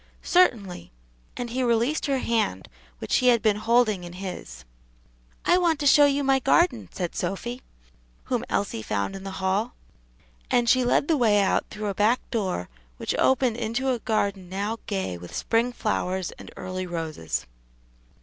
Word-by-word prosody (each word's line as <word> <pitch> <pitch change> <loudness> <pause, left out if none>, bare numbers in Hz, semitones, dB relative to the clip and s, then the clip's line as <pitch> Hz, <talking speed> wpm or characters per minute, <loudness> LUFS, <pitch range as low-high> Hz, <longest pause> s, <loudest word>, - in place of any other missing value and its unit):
"Certainly;" 205 - +2 0.5
and 240 -1 -4
he 255 +2 -1
released 240 +5 +1
her 275 -1 +1
hand, 220 - -1 0.3
which - - 0
he 255 - +2
had 235 -3 +4
been 215 -2 +3
holding 220 -3 +2
in 175 0 -8
his. 180 - -7 0.8
"I 355 - +4
want 335 -4 +2
to 295 - -2
show 290 +1 +7
you 285 0 +1
my 270 0 +3
garden," 270 -2 +2
said 175 -2 -4
Sophy, 240 +6 -4 0.6
whom - - -2
Elsie 100 +2 -1
found 105 - -2
in 195 - -8
the 195 - -5
hall; 195 +5 -1 0.7
and 240 -1 +2
she 255 +1 +4
led 245 +3 +2
the 320 - +3
way 215 -5 +4
out 195 - +2
through 215 0 -6
a 200 - -1
back 215 +5 +1
door 190 - -1 0.3
which - - -2
opened 255 -3 +3
into 240 +3 -1
a 245 - -1
garden 200 -5 -1
now 205 +4 -3
gay 190 - -3
with 90 0 -10
spring 230 +2 +1
flowers 190 -6 -2
and - - -12
early 185 0 -4
roses. 160 - -4
220 Hz, 170 wpm, -25 LUFS, 185-250 Hz, 0.8 s, show